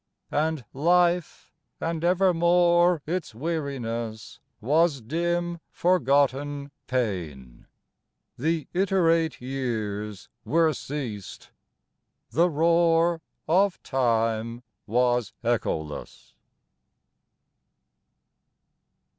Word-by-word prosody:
And 155 -4 0
life, 175 +3 +1 0.3
and 165 -1 -3
evermore 175 -2 +3
its 165 -8 -3
weariness 120 -7 -4 0.2
Was 150 +4 +2
dim 170 +7 -2
forgotten 145 -3 +1 0.2
pain, 85 - -3 0.7
the 160 +2 -1
iterate 170 -4 +2
years 110 -6 -4 0.2
Were 160 0 +2
ceased, 125 -9 -6 0.8
the 170 +3 +3
roar 165 +1 +3 0.3
of 185 +4 +3
time 115 -2 0 0.2
was 120 0 +1
echoless. 80 -10 -3
145 Hz, 65 wpm, -26 LUFS, 120-170 Hz, 0.8 s, evermore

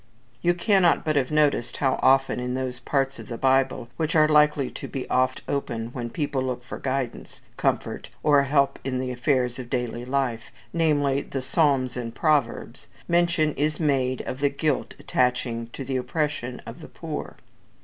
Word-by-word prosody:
You 175 0 +3
cannot 180 -1 +3
but 155 -1 +1
have 135 -3 +2
noticed 150 -5 +1
how 135 -2 +1
often 135 -1 +4
in 125 0 -2
those 130 -1 -3
parts 135 -1 -1
of - - -9
the 115 - -5
Bible 130 -2 +2
which 160 0 -1
are 155 -1 +6
likely 150 -3 +3
to - - -7
be 135 - -5
oftenest 130 0 +1
opened 115 -4 -3
when 120 -2 -4
people 145 -1 -2
look 125 -1 -3
for 120 - -7
guidance, 130 -2 -3 0.2
comfort, - - -1
or 145 -2 +5
help 140 0 +2
in 130 -1 -2
the 130 0 -2
affairs 125 -1 0
of 125 -2 -7
daily 120 -1 -2
life, 125 -3 -1 0.3
namely, 145 -4 +2
the 135 - -5
Psalms 135 -3 +2
and 115 -2 -5
Proverbs, 140 -4 0 0.2
mention 170 -3 +2
is 150 +2 -1
made 130 -5 +1
of 130 - -5
the 145 0 +3
guilt 140 0 -1
attaching 125 -2 0
to 135 - -6
the 130 0 -1
Oppression 130 -1 -2
of - - -9
the - - -9
poor. - - -6
135 Hz, 175 wpm, -25 LUFS, 125-150 Hz, 0.3 s, are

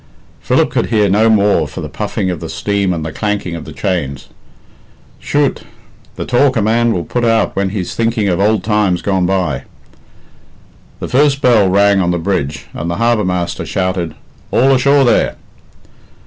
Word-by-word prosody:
Philip - - +1
could - - 0
hear 105 -3 +2
no 110 +4 +3
more 100 -7 +3
for - - -8
the - - -5
puffing 95 - -3
of 85 - -5
the - - -7
steam 100 -2 -1
and 80 -3 -3
the 80 - -4
clanking 105 -2 -3
of 85 - -7
the 80 - -9
chains. 75 -6 -3 0.9
"Chut! - - 0 0.5
the - - -5
talk 130 +1 +2
a - - +2
man 115 +2 +2
will 90 -6 -1
put 120 +6 -3
out 115 -1 +1
when 100 0 0
he's 95 -2 -4
thinking 115 -2 0
of 90 -2 0
ould 105 -1 +2
times 105 -5 +1
gone 95 -3 +1
by!" 90 -8 -1 1.3
The - - -4
first 140 +1 +2
bell 110 -6 +4
rang 100 +1 +3
on 90 - 0
the 90 - 0
bridge, 80 -5 -2
and 85 - -4
the 85 - -2
harbour 115 -1 +2
master 90 -1 -2
shouted, 90 -4 -2 0.3
"All 135 +2 +3
ashore, 140 +2 +4
there!" 120 - +2
100 Hz, 175 wpm, -15 LUFS, 90-115 Hz, 1.3 s, bell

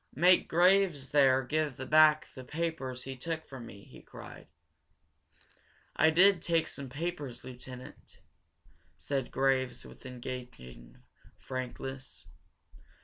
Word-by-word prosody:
"Make 180 +6 +5
Graves 175 -5 +3
there 135 -2 +4
give 150 0 -1
back 155 0 +6
the 130 - -9
papers 135 -4 -4
he 135 0 -6
took 160 +5 -4
from 130 -4 -9
me!" 100 -2 -12
he - - -15
cried. - - -12 1.5
"I 160 - +5
did 180 +2 +5
take 165 -2 +1
some 140 -2 -7
papers, 145 -3 -5
lieutenant," 125 0 -11 0.8
said 135 -3 -3
Graves, 135 -1 0
with - - -14
engaging 120 - -9 0.3
frankness. 130 - -7
135 Hz, 110 wpm, -31 LUFS, 125-160 Hz, 1.5 s, back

